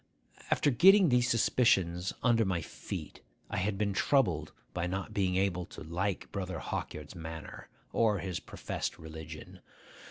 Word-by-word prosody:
After 145 - +3
getting 190 - +7
these 125 -1 +3
suspicions 95 -7 +3
under 120 -2 +4
my 95 -4 0
feet, - - -7 0.3
I 100 - -1
had 100 +1 0
been 100 -1 0
troubled 90 - +2 0.2
by 85 0 -1
not 95 +3 -4
being 95 -3 +1
able 90 -2 0
to - - -10
like 90 +4 -2
Brother 95 -2 -3
Hawkyard's 75 0 -5
manner, 80 -2 -8 0.2
or 110 -3 +3
his 95 -2 -3
professed - - -4
religion. 80 -1 -9
95 Hz, 145 wpm, -31 LUFS, 85-110 Hz, 0.3 s, getting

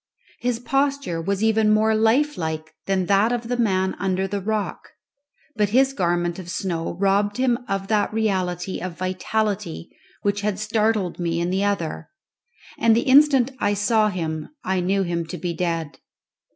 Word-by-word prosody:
His 245 -1 0
posture 275 -8 0
was 200 +4 -1
even 220 -1 +3
more 215 +1 +3
lifelike 220 - 0
than 190 -1 +1
that 200 +5 +3
of 240 -1 -3
the 245 - +1
man 190 -5 +1
under 190 0 0
the 200 +1 -3
rock, 215 +1 -3 0.7
but 210 -2 +1
his 265 +4 +3
garment 175 -3 0
of 180 -2 -8
snow 170 -3 -3
robbed 200 +3 +1
him 250 -2 +2
of 195 0 -2
that 210 -2 +1
reality 190 -4 -1
of 180 -2 -5
vitality 185 -1 -2 0.3
which 205 0 0
had 205 -2 -1
startled 215 -3 0
me 170 -1 -1
in 175 +1 -1
the 190 +2 0
other, 200 -6 -2 0.7
and 230 -1 +4
the 235 - +3
instant 270 -1 +5
I 205 0 +1
saw 215 +1 +2
him 160 -5 -4
I 190 0 0
knew 195 +2 +1
him 170 -1 -2
to 180 - -6
be 175 +1 -3
dead. 165 -3 -3
200 Hz, 165 wpm, -23 LUFS, 180-220 Hz, 0.7 s, instant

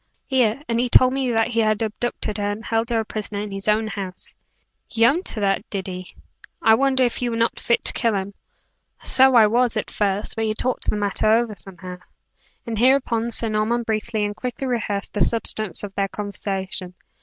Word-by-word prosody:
"Here; 255 -3 +1
and 230 0 0
he 245 0 0
told 255 +2 +6
me 265 -2 -1
that 225 0 +1
he 230 -1 -1
had 215 0 +1
abducted 215 -1 -3
her, 205 - -1
and 205 +2 -4
held 225 +1 0
her 230 -1 +1
a - - -7
prisoner 210 -1 -4
in 210 0 -5
his 195 +1 -3
own 215 +1 +2
house." 195 -3 -6 0.5
"He 230 0 +2
owned 320 +10 +2
that 200 0 -1
did 195 -2 -4
he? 185 -1 -8 0.4
I 220 - +5
wonder 260 +1 +3
you 245 - -1
were 230 - -3
not 230 0 0
fit 235 - 0
to - - +2
kill 230 -4 0
him?" 195 +1 -3 0.7
"So 265 0 +4
I 225 -2 +8
was, 235 +1 +1
at 215 - -3
first, 205 0 -1
but 225 - -1
he 215 0 -1
talked 255 +3 -1
the - - 0
matter 205 +1 0
over 230 0 +2
somehow." 180 -1 -9 0.7
And 225 -2 -3
hereupon 245 -2 +2
Sir 230 -1 +2
Norman 215 +3 0
briefly 220 -1 -1
and 205 0 -4
quickly 250 +3 -4
rehearsed 220 -5 -2
the 205 - -3
substance 215 -4 +2
of 200 -1 -6
their 195 0 0
conversation. 195 -3 -5
220 Hz, 200 wpm, -22 LUFS, 205-235 Hz, 0.7 s, I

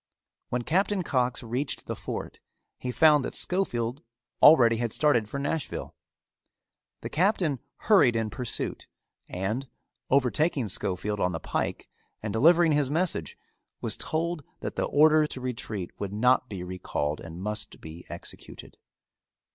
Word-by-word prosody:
When 125 0 -1
Captain 190 - +1
Cox 125 -5 0
reached 125 +4 -3
the - - -4
fort - - -6 0.4
he 125 - -4
found 150 0 +5
that - - -4
Schofield 125 -9 0 0.4
already 120 -7 +7
had 120 -1 -1
started 120 -8 +2
for 140 - -4
Nashville. 140 +2 -3 1.1
The - - -5
Captain 170 - +1 0.3
hurried 185 - +5
in 110 -1 -1
pursuit 125 +1 -4 0.4
and, 110 +9 -3 0.4
overtaking 135 -1 +2
Schofield 100 +2 -2
on 90 -1 +1
the 80 - -3
pike - - -3 0.4
and 105 -2 -3
delivering 165 +7 +5
his 145 -3 +2
message, 155 - -1 0.4
was - - -1
told 165 0 -2 0.2
that - - -4
the - - 0
order 155 +1 +5
to 130 - -7
retreat 115 -7 -4
would 100 -1 -4
not 125 +4 +3
be 95 -4 -5
recalled 75 -5 -3
and 85 +1 -9
must 105 +3 -4
be 80 +2 -11
executed. 85 - -9
125 Hz, 140 wpm, -27 LUFS, 105-155 Hz, 1.1 s, already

